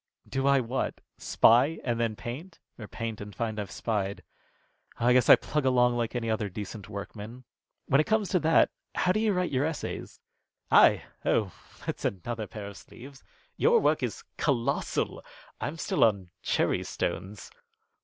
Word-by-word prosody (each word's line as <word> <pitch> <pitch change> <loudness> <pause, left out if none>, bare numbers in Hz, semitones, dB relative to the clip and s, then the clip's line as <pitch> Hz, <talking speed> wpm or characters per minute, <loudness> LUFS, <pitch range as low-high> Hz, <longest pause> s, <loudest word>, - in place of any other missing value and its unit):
"Do 135 +1 -1
I 140 0 +5
what? 125 +2 -2 0.2
Spy 130 +8 +4
and 120 -2 -1
then 115 -2 0
paint, 150 - -7 0.2
or 110 - -7
paint 115 -1 -5
and 105 -1 -8
find 110 -2 -2
I've 105 - -4
spied? 100 -3 -2 0.8
Oh, 115 - -1
I 125 - +6
guess 125 -2 +4
I - - +12
plug 150 -1 -2
along 125 -2 +3
like 120 0 -2
any 120 -2 -2
other 110 -2 -1
decent 105 +1 -7
workman. 105 +4 -8 0.4
When 140 +2 +4
it - - -4
comes 215 -2 +2
to 185 - +2
that, 160 0 +4 0.2
how 180 - +2
do 210 - +1
you 220 -1 +2
write 180 -2 0
your 130 0 +1
essays?" 160 0 -4 0.5
"I! - - +6 0.2
Oh! 105 -4 +1 0.3
That's - - -4
another 110 +3 -3
pair 105 +1 -8
of 100 0 -9
sleeves. 135 +2 -13 0.3
Your 470 0 +5
work - - +2
is - - -3
colossal. 140 -2 -1 0.4
I'm 155 - -4
still - - +1
on 100 -5 +2
cherry - - +1
stones." 100 +2 -4
120 Hz, 170 wpm, -28 LUFS, 105-140 Hz, 0.8 s, I